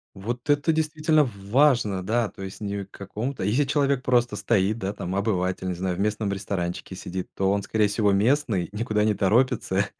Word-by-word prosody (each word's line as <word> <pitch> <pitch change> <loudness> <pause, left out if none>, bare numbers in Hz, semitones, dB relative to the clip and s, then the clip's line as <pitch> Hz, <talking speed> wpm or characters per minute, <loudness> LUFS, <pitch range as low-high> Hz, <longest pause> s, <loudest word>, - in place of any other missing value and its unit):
Вот 120 +7 -4
это 145 +2 +3
действительно 155 0 +2
в 100 -5 -9
важно, 120 -7 +3
да. 115 +3 0
То 100 - -11
есть 95 +1 -7
не 100 -1 -3
к 95 - -24
какому-то. 110 +6 -5
Если 120 +9 +2
человек 140 -2 +1
просто 120 -1 +2
стоит, 105 -1 +1
да, 95 -2 -3
там 95 -2 -5
обыватель, 95 -3 -1
не 90 - -1
знаю, 90 0 -2
в - - -5
местном 105 0 0
ресторанчике 95 -2 -4
сидит, 90 0 -5
то 95 0 +1
он, 100 0 +1
скорее 110 +1 +1
всего, 105 0 +1
местный, 105 - +1
никуда 105 0 0
не 110 -1 +2
торопится 105 -2 +2
105 Hz, 190 wpm, -25 LUFS, 95-125 Hz, -, это